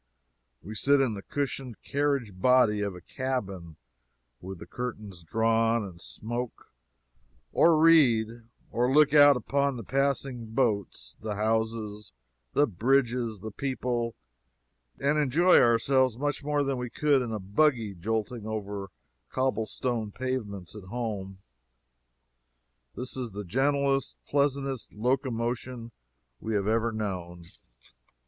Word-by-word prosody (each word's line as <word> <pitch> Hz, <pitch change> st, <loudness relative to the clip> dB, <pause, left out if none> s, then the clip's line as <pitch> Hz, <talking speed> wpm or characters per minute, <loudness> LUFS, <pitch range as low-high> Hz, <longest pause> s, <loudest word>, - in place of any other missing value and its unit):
We 105 Hz, +6 st, -7 dB
sit 140 Hz, +6 st, +3 dB
in 130 Hz, -4 st, +2 dB
the 100 Hz, -, -6 dB
cushioned 135 Hz, -2 st, -4 dB
carriage 140 Hz, -6 st, 0 dB
body 110 Hz, 0 st, +4 dB
of 100 Hz, -2 st, -2 dB
a 90 Hz, -, -10 dB
cabin, 100 Hz, -, -4 dB, 0.7 s
with 95 Hz, +1 st, -7 dB
the -, -, -10 dB
curtains 105 Hz, -7 st, -6 dB
drawn, 115 Hz, +5 st, +2 dB
and 90 Hz, -4 st, -9 dB
smoke, 115 Hz, -, -6 dB, 0.8 s
or 165 Hz, -1 st, +5 dB
read, 120 Hz, -8 st, +4 dB, 0.3 s
or 125 Hz, +2 st, +1 dB
look 150 Hz, 0 st, +5 dB
out 145 Hz, -2 st, +8 dB
upon 140 Hz, +2 st, 0 dB
the 115 Hz, -, -6 dB
passing 135 Hz, -1 st, -1 dB
boats, 100 Hz, -, -1 dB
the 105 Hz, -1 st, -3 dB
houses, 110 Hz, -, -2 dB, 0.4 s
the 145 Hz, -, +4 dB
bridges, 120 Hz, -1 st, +1 dB
the 110 Hz, -, -6 dB
people, 120 Hz, -1 st, -2 dB, 0.8 s
and 145 Hz, +2 st, +1 dB
enjoy 160 Hz, +6 st, +5 dB
ourselves 120 Hz, +1 st, +3 dB
much 145 Hz, +1 st, -2 dB
more 145 Hz, 0 st, +1 dB
than 135 Hz, -1 st, -1 dB
we 125 Hz, -1 st, -4 dB
could 145 Hz, +1 st, +2 dB
in 120 Hz, -2 st, -3 dB
a 110 Hz, -, -2 dB
buggy 110 Hz, +2 st, +1 dB
jolting 110 Hz, +4 st, -3 dB
over 105 Hz, -2 st, -4 dB
our 95 Hz, -2 st, -9 dB, 0.4 s
cobble 130 Hz, -4 st, 0 dB
stone 115 Hz, -5 st, -2 dB
pavements 105 Hz, -8 st, -4 dB
at 105 Hz, -3 st, -9 dB
home. 100 Hz, -3 st, -4 dB, 1.6 s
This 125 Hz, +1 st, -6 dB
is 125 Hz, -5 st, -5 dB
the 105 Hz, +1 st, -5 dB
gentlest, 135 Hz, +5 st, +1 dB
pleasantest 140 Hz, -2 st, -1 dB
locomotion 120 Hz, 0 st, -2 dB, 0.5 s
we 110 Hz, -1 st, -3 dB
have 100 Hz, -1 st, +1 dB
ever 115 Hz, +1 st, +1 dB
known. 90 Hz, -5 st, -5 dB
115 Hz, 125 wpm, -28 LUFS, 105-135 Hz, 1.6 s, out